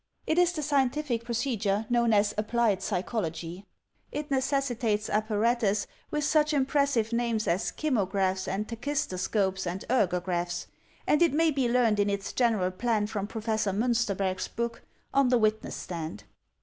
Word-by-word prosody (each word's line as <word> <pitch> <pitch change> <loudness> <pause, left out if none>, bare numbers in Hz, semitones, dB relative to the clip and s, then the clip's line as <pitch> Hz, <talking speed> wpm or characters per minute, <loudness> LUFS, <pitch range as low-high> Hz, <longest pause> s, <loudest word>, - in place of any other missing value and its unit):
It 315 - +2
is 355 -1 +4
the 310 -4 -4
scientific 275 -3 0
procedure 225 -4 0
known 235 -1 +2
as 205 -1 +3
applied 215 -2 +1
psychology. 180 -2 -3 0.4
It 295 0 -5
necessitates 255 -6 0
apparatus 215 0 +1 0.2
with 300 0 -1
such 300 0 +3
impressive 275 -5 +1
names 235 -2 0
as 175 +5 0
kymographs 195 -9 0
and 205 +3 -2
tachistoscopes 195 -7 -1
and 180 +3 -4
ergographs; 180 -5 0 0.4
and 300 - +3
it 335 -4 +4
may 325 +1 +3
be 270 -4 +1
led, 235 -3 +3
rned - - -2
in 205 0 +3
its 200 -1 -3
general 220 -7 +2
plan 215 +2 0
from 205 -1 -3
Professor 220 -2 -1
Miinsterberg's 200 -4 0
book, 235 0 -4 0.3
"On 275 -2 +4
the 250 - +4
Witness 215 -1 0
Stand." 160 - -6
225 Hz, 145 wpm, -28 LUFS, 195-255 Hz, 0.4 s, is